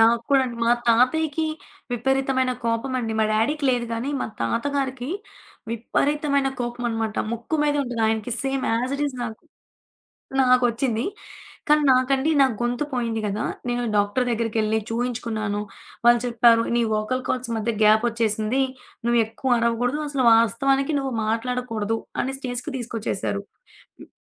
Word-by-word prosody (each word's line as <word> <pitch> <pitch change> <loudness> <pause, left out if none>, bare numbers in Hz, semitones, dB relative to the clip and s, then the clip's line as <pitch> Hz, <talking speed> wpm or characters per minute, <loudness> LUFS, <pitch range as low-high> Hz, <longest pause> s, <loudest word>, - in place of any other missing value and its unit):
నాకు 230 +1 +5
కూడా 275 - +6
అండి. 240 -2 -5
మా 235 - +4 0.2
తాతయ్యకి 300 +7 +3 0.5
విపరీతమైన 265 +1 +1
కోపమండి. 230 0 -1
మా 220 - +4
డ్యాడీకి 280 +8 +1
లేదు 245 -2 0
గానీ, 235 +5 -2
మా - - -1
తాతగారికి 260 - -1 0.6
విపరీతమైన 280 +4 0
కోపమనమాట 235 -2 -2 0.2
ముక్కు 235 +7 -2
మీదే 290 -1 +1
ఉంటది. 240 -3 -3
ఆయనకి 220 +2 -1
సేమ్ 270 -1 -1
యాజ్ 250 +4 0
ఇట్ 290 - -2
ఈజ్ 260 -3 -5
నాకు 220 -2 -7 1.0
నాకొచ్చింది. 250 -2 +2 0.6
కానీ, 300 0 +5
నాకండి 265 +4 +2
నాకు 260 -4 +2
గొంతు 245 +4 0
పోయింది 230 -3 -1
కదా! 210 +1 -2 0.2
నేను 245 0 0
డాక్టరు 205 +5 +2
దగ్గరికెళ్ళి 220 -1 0
చూయించుకున్నాను. 225 -3 -2 0.4
వాళ్ళు 240 0 +6
చెప్పారు, 230 -1 +5
"నీ 240 - +3
వోకల్ 215 +5 -1
కార్డ్స్ 250 -2 -1
మధ్య 225 +2 -1
గ్యాపొచ్చేసింది. 220 +2 +2 0.4
నువ్వు 235 0 +3
ఎక్కువ 240 +2 0
అరవకూడదు. 235 +4 0
అసలు 275 -3 0
వాస్తవానికి 270 +6 +3
నువ్వు 270 -2 -2
మాట్లాడకూడదు" 225 -1 -1 0.2
అనే 265 +1 -2
స్టేజ్‌కి 255 +2 -4
తీసుకొచ్చేేశారు. 205 - -3 0.6
హ్మ్. - - -12
240 Hz, 130 wpm, -23 LUFS, 225-265 Hz, 1.0 s, కూడా